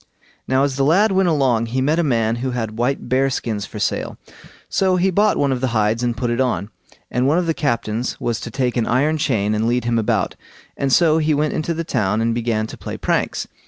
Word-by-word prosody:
Now 130 +1 +2
as 140 -1 -1
the 135 - +2
lad 190 +9 +4
went 190 -1 +2
along 130 -7 +2
he 125 +3 -2
met 150 +5 +1
a - - +2
man 115 -5 +1
who 130 +2 -2
had 115 -3 -3
white 135 +3 -1
bear 135 +1 +2
skins 110 -5 -3
for 105 - -9
sale, 105 - -2 0.5
so 190 -1 +1
he 185 +1 +2
bought 205 +3 +2
one 140 -1 +1
of 130 -2 -1
the 130 - +1
hides 110 +2 +1
and 120 -1 -1
put 120 +1 -1
it 120 +2 0
on; 115 -5 -1 0.4
and 125 +2 +1
one 150 +4 +3
of 180 - +1
the 165 - +1
captains 115 -4 -2
was 120 -1 -2
to 120 - -6
take 125 +1 -1
an 115 - 0
iron 150 +6 +1
chain 110 -8 0
and 110 +1 0
lead 120 +1 +1
him 120 -1 +1
about, 110 - 0 0.4
and 135 -1 -1
so 160 +1 +4
he 155 -1 +1
went 150 +1 0
into 160 +2 -2
the 165 - -2
town 110 -9 0
and 115 +1 +1
began 115 -2 -1
to - - -9
play - - -6
pranks. - - -1
125 Hz, 240 wpm, -20 LUFS, 115-150 Hz, 0.5 s, lad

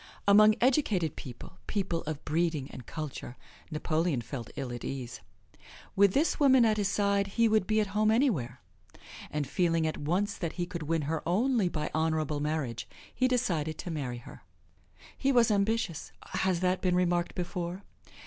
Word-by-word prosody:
Among 215 +1 +7
educated 225 - +2
people, 120 -3 -10
people 185 -5 -1
of 155 -2 -5
breeding 155 -3 0
and 125 - -10
culture, 150 -5 -6 0.3
Napoleon 155 -2 0
felt 120 0 -7
ill 130 -3 -4
at 120 - -7
ease. 125 -3 -5 0.7
With 200 -1 +5
this 305 +5 +2
woman 265 -4 +6
at 215 -1 +2
his 205 -2 +1
side 200 0 +1
he 230 0 +5
would 215 -3 +2
be 215 0 +2
at 215 - +2
home 215 +1 +3
anywhere. 220 - +1 0.7
And 150 -1 -2
feeling 165 +2 +1
at 155 - -2
once 185 +8 0
that 170 -3 -3
he 175 - -2
could 175 -1 -6
win 160 +1 0
her 155 +2 -2
only 220 +1 +2
by 155 -3 -3
honorable 155 -2 0
marriage 145 -6 -2 0.3
he 255 - +2
decided 170 -12 0
to 180 - -5
marry 135 -6 -3
her. 120 - -12 0.7
He 275 - +1
was 240 -4 +4
ambitious. 200 -4 0 0.2
Has 185 -2 0
that 185 0 +1
been 180 -2 +2
remarked 175 -1 +1
before? 175 +1 -4
175 Hz, 170 wpm, -30 LUFS, 155-210 Hz, 0.7 s, Among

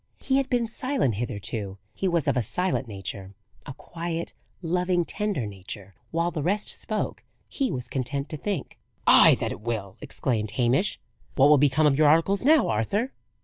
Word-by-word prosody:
He 265 0 +1
had 275 -1 0
been 240 -2 +1
silent 255 - -1
hitherto; 100 -2 -4 0.2
he 195 - -2
was 170 -4 +1
of - - +2
a 125 - +2
silent 180 - -1
nature: 95 -1 -6 0.3
a - - -6
quiet, 170 0 -5 0.3
loving, 180 +1 +1
tender 205 - -2
nature: 100 0 -9 0.2
while 170 +1 0
the 155 - -3
rest 200 +7 0
spoke, 215 -2 -3 0.2
he 270 -3 -1
was 125 -2 -4
content 140 +2 -3
to 155 - -5
think. 200 +5 -4 0.3
"Ay, - - +8
that - - -2
it - - -7
will!" 105 -4 -4
exclaimed 110 -5 -1
Hamish. 130 - +2 0.4
"What 140 +1 +6
will 150 -2 +6
become 145 +2 +3
of 145 -1 +3
your 155 - +6
articles 165 +7 +3
now, 305 +2 +5
Arthur?" 195 - 0
150 Hz, 175 wpm, -26 LUFS, 115-190 Hz, 0.4 s, Ay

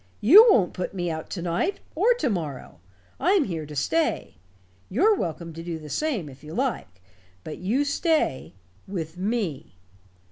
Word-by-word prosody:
You 400 - +9
won't 195 - +3
put 185 +2 -5
me 175 -2 -2
out 160 0 -6
to 175 - -5
night, 175 - -1
or 445 +9 +3
to 315 - -1
morrow. 150 - -5 0.4
I'm 365 +3 +3
here 165 - -5
to 150 - -9
stay. 320 - 0 0.6
You're 385 - +4
welcome 170 - -4
to 165 - -8
do 170 -1 -5
the 155 -1 -10
same, 265 - -1
if 135 0 -13
you 155 +2 -8
like. 160 - -3 0.4
But 155 - -7
you 235 +11 0
stay 290 - 0 0.3
with 165 -4 -5
me. 190 - -3
180 Hz, 165 wpm, -25 LUFS, -, 0.6 s, You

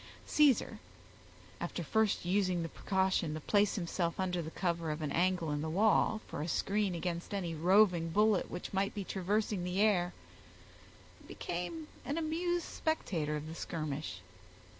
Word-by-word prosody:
Caesar, 295 -5 +3 0.8
after - - -3
first 220 -4 +1
using 185 -2 +1
the 165 - -4
precaution 190 -5 0
to - - -4
place 205 +6 +2
himself 170 -2 -2
under 180 -2 0
the 160 - -5
cover 170 -2 -1
of 155 +1 -3
an 150 - -2
angle 175 -2 +1
in 145 0 -1
the 160 - -2
wall, 215 +4 +3
for - - -5
a 155 - -2
screen 200 +2 0
against 170 +2 -3
any 175 -4 -2
roving 175 0 +4
bullet 210 +2 +3
which 175 - -6
might 195 +1 0
be 205 - -2
traversing 200 +1 -1
the 180 +2 -2
air, 190 -5 +3 1.2
became 180 - -4 0.2
an 290 - -3
amused 335 +2 0
spectator 165 - -1
of 150 0 -4
the 160 - -6
skirmish. 150 - -4
180 Hz, 155 wpm, -33 LUFS, 165-210 Hz, 1.2 s, roving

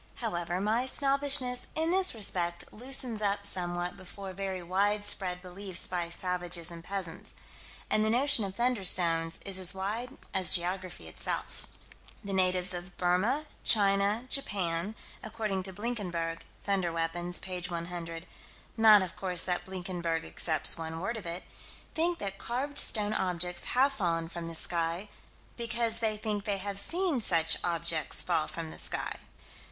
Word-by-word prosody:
However, 175 -6 -2
my 220 +6 +1
snobbishness, 275 -2 +3
in 320 +1 +1
this 375 -6 +3
respect, 175 -5 0
loosens 250 -1 +1
up 200 0 0
somewhat 175 -2 0
before 190 0 -8
very 190 -1 -4
widespread 195 -1 +1
belief 185 0 +1
by 175 -2 -1
savages 175 -1 -1
and 165 -1 -9
peasants. 180 -3 -2 0.5
And 215 - +2
the 215 - +2
notion 250 0 +4
of 195 -1 -5
"thunderstones" 180 -9 +2
is 195 -1 -1
as 185 0 +2
wide 225 +7 -3 0.2
as 190 -3 +4
geography 180 - -3
itself. 80 - -3 0.6
The 200 -1 -4
natives 185 -1 +3
of 175 +1 -7
Burma, 185 +12 +1 0.2
China, 200 +2 +3
Japan, 195 -7 0 0.3
according 215 -3 -3
to - - -6
Blinkenberg 180 -6 -3 0.2
(Thunder 190 -4 0
Weapons, 175 +2 -2
p. 185 -1 -4
100) 170 -1 -5 0.5
not, 215 -3 +7
of 185 - -6
course, 180 -3 -1
that 180 -1 -1
Blinkenberg 175 -3 -3
accepts 160 0 +3
one 160 0 -4
word 230 +7 -2
of 210 -6 -7
it 170 +2 -3 0.5
think 340 +2 +1
that 195 -1 -5
carved 275 +6 -1
stone 210 -1 +3
objects 180 -2 -1
have 270 +3 +3
fallen 165 -8 -1
from 170 -1 -6
the 165 - -5
sky, 170 +4 -1 0.5
because 235 -1 +1
they 220 -2 +1
think 210 -1 -2
they 205 -2 0
have 200 0 -3
seen 340 - +1
such 165 -5 +3
objects 170 -3 0
fall 165 -3 +1
from 165 -1 -6
the - - -7
sky. - - -2
190 Hz, 145 wpm, -30 LUFS, 175-220 Hz, 0.6 s, not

